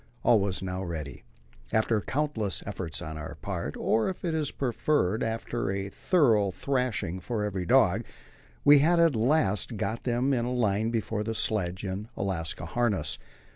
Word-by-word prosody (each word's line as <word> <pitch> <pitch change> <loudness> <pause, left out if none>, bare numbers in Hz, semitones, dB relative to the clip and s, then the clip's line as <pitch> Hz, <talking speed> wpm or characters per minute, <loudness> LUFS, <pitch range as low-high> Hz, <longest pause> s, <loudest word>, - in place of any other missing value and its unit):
All 115 - +5
was 95 -1 -2
now 90 0 -3
ready; 75 -8 -6 0.5
after 110 -1 +2
countless 130 -9 -1
efforts 90 -6 -4
on 80 -1 -6
our 75 - -7
part, - - -4
or, 110 +8 +1
if 185 - -6
it 165 - 0
is 155 -3 0
preferred, 120 -5 0
after 115 +1 -2
a 95 0 -2
thorough 115 - +3
thrashing 110 -6 -1
for 105 +3 -3
every 95 -4 -3
dog, 115 -5 +4 0.6
we 145 0 +8
had 170 +4 +4
at 165 -5 +4
last 115 -3 +1
got 110 +4 -2
them 125 +3 +1
in 120 -2 +1
a 120 - -2
line 110 -2 +1
before 110 -2 -1
the 110 +1 -3
sledge 95 -4 0
in 100 +2 -4
Alaska 90 -5 -3
harness. 100 - 0
110 Hz, 165 wpm, -28 LUFS, 95-125 Hz, 0.6 s, we